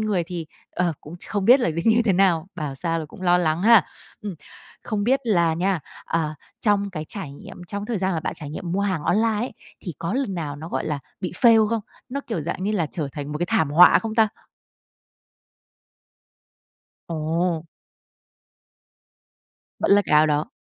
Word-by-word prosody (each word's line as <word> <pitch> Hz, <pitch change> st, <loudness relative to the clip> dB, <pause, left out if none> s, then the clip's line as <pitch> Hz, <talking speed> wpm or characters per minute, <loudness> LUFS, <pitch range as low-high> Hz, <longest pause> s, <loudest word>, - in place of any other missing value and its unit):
người 210 Hz, -5 st, +1 dB
thì, 175 Hz, -3 st, -5 dB, 0.2 s
ờ, 175 Hz, -2 st, 0 dB
cũng 155 Hz, +4 st, -10 dB
ch -, -, -8 dB
không 205 Hz, -2 st, -1 dB
biết 250 Hz, +6 st, +7 dB
là 205 Hz, -, +1 dB
nó 155 Hz, -, -6 dB
như 230 Hz, +1 st, +4 dB
thế 200 Hz, -, +3 dB
nào, 180 Hz, -3 st, +3 dB
bảo 150 Hz, -5 st, -4 dB
sao 165 Hz, +3 st, -2 dB
là 160 Hz, -, -4 dB
cũng 185 Hz, -, -13 dB
lo 175 Hz, -1 st, +4 dB
lắng 165 Hz, 0 st, 0 dB
ha. 230 Hz, 0 st, +7 dB, 0.4 s
Ừm, 205 Hz, -4 st, -4 dB, 0.5 s
không 205 Hz, -2 st, -2 dB
biết 265 Hz, +3 st, +3 dB
là 170 Hz, -7 st, +2 dB
nha, 180 Hz, 0 st, 0 dB, 0.2 s
ờ, 155 Hz, -2 st, -1 dB, 0.3 s
trong 200 Hz, -2 st, +1 dB
cái 155 Hz, -3 st, -5 dB
trải 190 Hz, -9 st, -6 dB
nghiệm 175 Hz, +5 st, -11 dB
trong 205 Hz, 0 st, -4 dB
cái 240 Hz, -, -5 dB
thời 210 Hz, -, 0 dB
gian 190 Hz, 0 st, 0 dB
mà 160 Hz, -, -1 dB
bạn -, -, -3 dB
trải 150 Hz, -3 st, -7 dB
nghiệm 170 Hz, +3 st, -5 dB
mua 195 Hz, -, 0 dB
hàng 185 Hz, -6 st, -1 dB
online 225 Hz, +7 st, +2 dB
ấy, 240 Hz, +4 st, -3 dB, 0.3 s
thì 175 Hz, -, -5 dB
có 170 Hz, -, -3 dB
lần 255 Hz, -8 st, -1 dB
nào 150 Hz, -4 st, -4 dB
nó, 160 Hz, +3 st, -8 dB
gọi -, -, -2 dB
là, 150 Hz, -2 st, -2 dB, 0.2 s
bị 180 Hz, -, -3 dB
fail 225 Hz, -3 st, +6 dB
không? 230 Hz, -1 st, 0 dB, 0.3 s
Nó, 280 Hz, +3 st, -3 dB
kiểu, 205 Hz, -9 st, -2 dB
dạng 170 Hz, +4 st, -4 dB
như 210 Hz, -, 0 dB
là, 175 Hz, -7 st, +1 dB
trở 155 Hz, -6 st, -3 dB
thành 145 Hz, 0 st, -5 dB
một 150 Hz, -, -3 dB
cái 175 Hz, -, -1 dB
thảm 155 Hz, -5 st, +1 dB
họa 175 Hz, +4 st, +8 dB
không 220 Hz, -1 st, -4 dB
ta? 225 Hz, -1 st, +4 dB, 2.8 s
Ồ. 165 Hz, +1 st, -1 dB, 2.1 s
Vẫn -, -, 0 dB
là 205 Hz, 0 st, +6 dB
cái -, -, -3 dB
áo 155 Hz, +1 st, +6 dB
đó. 150 Hz, 0 st, +1 dB
180 Hz, 205 wpm, -23 LUFS, 160-210 Hz, 2.8 s, họa